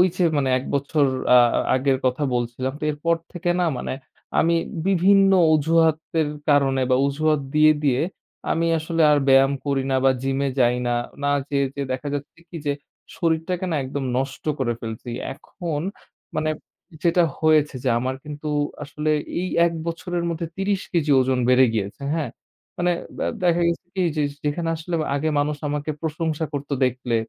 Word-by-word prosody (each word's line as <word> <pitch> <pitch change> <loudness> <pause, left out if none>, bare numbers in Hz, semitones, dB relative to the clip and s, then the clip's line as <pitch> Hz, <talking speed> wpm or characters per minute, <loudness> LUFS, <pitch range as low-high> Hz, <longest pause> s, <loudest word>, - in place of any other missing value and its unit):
যে 180 - +1
মানে 135 -2 +1
১ 130 - -5
বছর 140 +1 +1 0.3
আ - - +9 0.2
আ - - +2 0.2
আগের 130 0 +2
কথা 130 +3 +1
বলছিলাম। 120 +2 -2
তো - - -6
এরপর 165 +3 0 0.2
থেকে 175 0 -2
না 175 - +2
মানে - - -3 0.5
আমি 170 +1 +3 0.3
বিভিন্ন 195 +1 +5 0.2
অজুহাতের 160 0 +2 0.2
কারণে 135 -2 +3
বা 130 - +4
অজুহাত 150 +1 +1
দিয়ে, 155 0 +7
দিয়ে 130 -2 +2 0.5
আমি 165 0 +1
আসলে 165 +1 -1
আর 145 - +5
ব্যায়াম 135 +1 +5
করি 135 -1 0
না - - +3
বা 135 - +6
জিমে 135 +1 0
যাই 120 0 +4
না। 120 - +1 0.3
না 145 - +2 0.2
যেয়ে, 140 -1 +1
যেয়ে 140 -2 -4
দেখা 140 +3 -5
যাচ্ছে 145 +3 -6
কি 170 - -7
যে, 145 - +1 0.4
শরীরটাকে 170 +2 0
না - - +1
একদম 135 +1 -4
নষ্ট 135 0 -3 0.2
করে 120 -3 0
ফেলছি। 115 +2 -6 0.2
এখন 155 0 -5 0.5
মানে 155 0 0 0.5
যেটা 170 0 +4 0.2
হয়েছে 155 -3 +3
যে, 130 - +1
আমার 130 +1 -2
কিন্তু 150 0 -6 0.3
আসলে 150 +1 -3 0.3
এই 185 - -2 0.2
১ 170 - 0
বছরের 170 +1 -3
মধ্যে 165 0 -3
৩০ 195 0 0
কেজি 155 -4 +1
ওজন 130 0 +1
বেড়ে 130 +1 +6
গিয়েছে। 100 +4 -3
হ্যাঁ? 155 -7 -1 0.5
মানে 175 0 +2 0.3
ব্য - - -5 0.2
দেখা 175 -1 +3
গেছে 170 0 -2
কি 185 - 0 0.2
যে 150 - +2 0.2
যেখানে 165 +3 -1
আসলে 170 +2 -4 0.2
আগে 155 +2 0
মানুষ 145 +1 0
আমাকে 145 +1 -3
প্রশংসা 160 0 -2
করত 145 +1 -4 0.2
দেখলে। 125 -1 -1
150 Hz, 170 wpm, -23 LUFS, 135-165 Hz, 0.5 s, আ